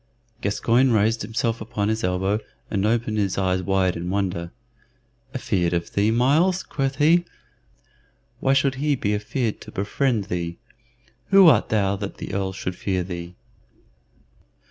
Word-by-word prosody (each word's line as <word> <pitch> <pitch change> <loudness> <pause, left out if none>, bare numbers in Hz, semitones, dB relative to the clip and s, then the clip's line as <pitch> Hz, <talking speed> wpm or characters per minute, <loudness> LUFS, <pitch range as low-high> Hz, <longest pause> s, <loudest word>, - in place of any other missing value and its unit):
Gascoyne 120 +5 +2
raised 110 +1 +2
himself 115 +1 -2
upon 105 -2 -2
his 110 +1 -1
elbow, 95 +3 0 0.3
and 100 0 +1
opened 110 -1 0
his 100 -2 0
eyes 95 -1 +1
wide 95 -1 +1
in 85 +1 -4
wonder. 90 -3 -2 0.9
"Afeard 90 -8 0
of 85 -1 -2
thee, 100 +2 +2
Myles!" 150 +11 +2
quoth 135 -2 -2
he. 160 +5 +4 1.2
"Why 135 - +2
should 135 0 +2
he 150 -1 +2
be 105 -5 -1
afeared 110 +2 -2
to - - -10
befriend 110 +3 0
thee? 85 -4 -4 0.7
Who 195 -2 +7
art 125 -9 +5
thou 100 -2 +1
that 100 0 -6
the - - -7
Earl 95 -1 -1
should 90 -1 -5
fear 95 -1 -1
thee?" 85 -1 -7
105 Hz, 145 wpm, -23 LUFS, 95-125 Hz, 1.2 s, Who